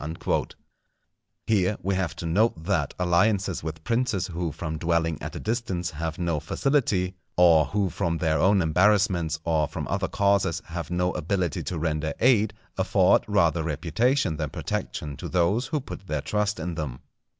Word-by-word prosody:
_" 80 +3 -2 0.9
Here 100 -2 +2
we 95 - 0
have 90 -3 -1
to - - -6
note 85 0 +1
that 85 -6 0
alliances 95 +1 +2
with 80 0 -6
princes 115 -4 0
who 85 -2 -3
from 80 +1 -5
dwelling 80 -1 0
at - - -6
a - - -4
distance 105 -6 -2
have 80 +1 -4
no 85 -3 -1
facility, 95 - 0 0.2
or 85 -4 +6
who 100 -3 -1
from 85 -1 -1
their 80 -3 +1
own 95 +3 +4
embarrassments, 90 -1 +2
or 80 -2 +1
from - - -5
other 95 0 -1
causes, 100 -4 +1
have 85 -2 -5
no 90 +1 0
ability 90 0 -1
to 90 - -4
render 80 -1 -1
aid, 110 -4 +3 0.2
afford 95 0 +4
rather 85 -5 +2
reputation 80 - 0
than 75 -2 -2
protection 70 +1 -4
to - - -6
those 95 +8 +1
who 150 - -1
put 115 -7 -9
their 75 -4 -1
trust 105 +3 -1
in 85 +2 -3
them. 75 -6 -5
90 Hz, 165 wpm, -26 LUFS, 80-100 Hz, 0.9 s, or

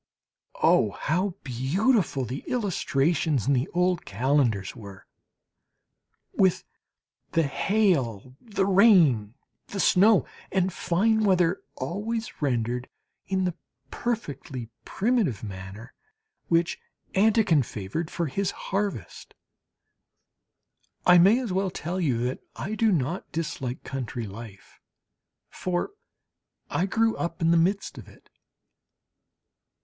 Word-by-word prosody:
Oh, 105 - +4
how 180 +4 0
beautiful 145 - +1
the 130 +4 -6
illustrations 160 - 0
in 140 - +3
the 130 +3 +1
old 180 0 0
calendars 120 -3 0
were! 100 -5 -11 1.3
with 190 -2 +2 0.7
the 165 - +3
hail, 140 - 0
the 205 -5 -1
rain, 175 - +5 0.3
the 200 - -6
snow 200 +3 +5 0.3
and 185 -1 +1
fine 215 +7 +1
weather 180 -2 +2
always 210 - -4
rendered 125 -2 -1 0.4
in 190 -1 0
the 180 - -1 0.4
perfectly 140 - -4 0.2
primitive 205 - 0
manner 95 +2 -8 0.5
which 170 0 +1 0.3
Anquetin 200 -6 +4
favoured 110 - -4
for 170 -1 -2
his 190 +6 -1
"Harvest." 195 - -4 1.7
I 180 -1 +7
may 195 +7 +6
as 235 -8 -3
well 190 +1 +1
tell 180 +1 -4
you 135 -8 +1
that 125 - -2 0.2
I 210 - -4
do 220 0 +2
not 165 +1 -1
dislike 145 -6 -4
country 125 -3 -4
life 100 0 -11 0.7
for 180 - -2 0.8
I 185 - +1
grew 225 +2 +2
up 170 -1 -3
in 165 0 +3
the - - +5
midst 185 +5 +1
of - - -12
it. - - -19
170 Hz, 110 wpm, -26 LUFS, 130-195 Hz, 1.7 s, I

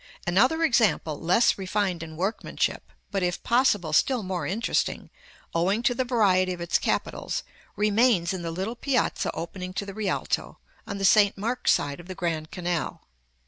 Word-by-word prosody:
Another 255 - +3
example, 215 - +2
less 185 +6 +3
refined 190 -2 -1
in 160 -1 -8
workmanship, 195 +6 -2 0.2
but, 195 - -1
if 175 -1 -1
possible, 210 - +2
still 250 - +3
more 185 -1 -3
interesting, 225 +5 -1 0.4
owing 190 +7 +1
to 245 - +3
the 260 - 0
variety 195 -7 +2
of 175 - -8
its 170 0 +1
capitals, - - -2 0.3
remains 210 -3 +3
in 185 - -4
the 170 - -4
little 190 +7 -3
piazza 255 +1 0
opening 180 +3 -6
to 185 +2 -3
the 200 - -7
Rialto, 200 -3 -2 0.3
on 200 - -4
the 195 - -1
St. 205 0 +5
Mark's 230 +5 0
side 145 +1 0
of 175 - -12
the 185 - -6
Grand 160 -3 -2
Canal. 175 -2 -3
190 Hz, 165 wpm, -26 LUFS, 175-225 Hz, 0.4 s, St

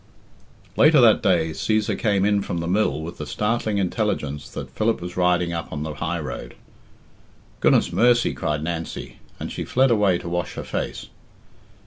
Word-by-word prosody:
VII. - - +2
Latter 155 -3 +6
that 115 -3 +6
day 85 -4 +2
Cæsar 110 +6 0
came 100 -3 +1
in 105 -1 +2
from 85 - -4
the 85 0 -3
mill 90 -6 +1
with 85 +2 -8
the 75 - -5
startling 105 +5 -1
intelligence 90 - -2
that - - -7
Philip 110 +1 0
was 90 0 -7
riding 90 -1 +2
up 85 -1 -5
on 75 -1 -4
the 80 -1 -4
highroad. 80 -5 -4 1.0
"Goodness - - +3
mercy!" 120 0 +3
cried 75 0 -2
Nancy, 85 0 -5 0.2
and - - -5
she - - -4
fled 130 0 +2
away 105 -5 +3
to 85 - -8
wash 90 -1 -3
her - - -5
face. - - -4
90 Hz, 170 wpm, -23 LUFS, 80-110 Hz, 1.0 s, Latter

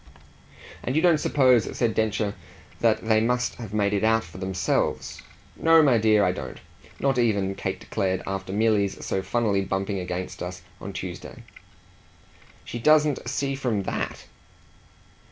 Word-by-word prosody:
"And 130 - -2
you 155 - +3
don't 170 -4 +5
suppose," 130 -6 +3
said 115 -3 +1
Densher, 110 -2 0 0.5
"that 115 -1 +2
they 110 -1 +4
must 125 +2 0
have 110 -5 -8
made 105 -1 +1
it 100 - 0
out 115 0 +3
for 90 +1 -12
themselves?" 95 -2 -1 0.3
"No, 165 -1 +5
my 130 -6 +4
dear, 110 -1 +4
I 90 - +2
don't; - - -7 0.4
not 135 -2 +1
even," 100 -5 +1
Kate - - -4
declared, 95 -1 -2
"after 95 -1 -4
Milly's 105 -1 +1
so 95 - -1
funnily 105 -2 0
bumping 95 +1 -2
against 90 0 -5
us 90 +1 -6 0.2
on - - -6
Tuesday." - - -7 1.2
"She 120 - -5
doesn't 150 -2 +3
see 140 +1 -1
from 125 -7 -1
THAT - - -4
110 Hz, 150 wpm, -25 LUFS, 95-125 Hz, 1.2 s, don't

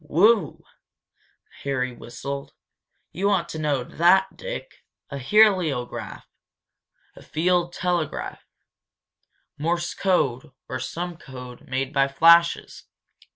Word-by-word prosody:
"Whew!" 200 +2 +3 1.0
Harry 130 -3 -2
whistled, 140 +4 -7 0.6
"You 195 +4 0
ought 185 -4 +1
to 160 - -5
know 145 -4 0
that, 185 +7 +3
Dick! - - -7 0.3
A 140 - -4
heliograph 175 - +2 1.0
field 175 +1 0
telegraph. 175 -3 -2 1.2
Morse 170 +2 -1
code 145 -7 0
or 130 - -4
some 170 +6 -5
code 125 -5 -11
made 130 +2 -2
by 135 -1 +3
flashes. 170 +4 +4
160 Hz, 95 wpm, -24 LUFS, 135-180 Hz, 1.2 s, flashes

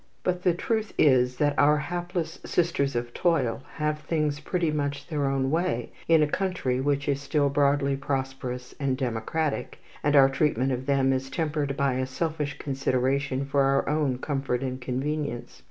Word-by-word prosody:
But 180 -1 0
the 180 -2 +2
truth 220 +3 -2
is 125 -3 +4
that 145 0 +1
our 150 +1 +5
hapless 175 +1 -3
sisters 140 -6 0
of 120 0 -3
toil 145 -9 +1
have 150 -1 -1
things 150 -1 -1
pretty 170 +1 -1
much 145 -1 -2
their 145 -4 -1
own 135 0 0
way 135 -8 -1 0.2
in 165 -2 +5
a - - +2
country 150 -8 -1
which 140 +1 0
is 140 -1 0
still 145 0 +1
broadly 140 0 +2
prosperous 130 -2 -4
and 135 -2 0
democratic, 130 +5 -2 0.2
and 145 0 +2
our 135 -1 +8
treatment 135 -2 +1
of 130 +1 -3
them 135 -1 +3
is 130 0 -2
tempered 150 -4 -1
by 140 -2 +2
a 130 0 -1
selfish 150 0 -2
consideration 135 0 0
for 140 0 +1
our 135 0 +2
own 150 -4 +1
comfort 135 -2 -2
and 130 -1 -4
convenience. 135 0 -3
140 Hz, 170 wpm, -26 LUFS, 130-150 Hz, 0.2 s, our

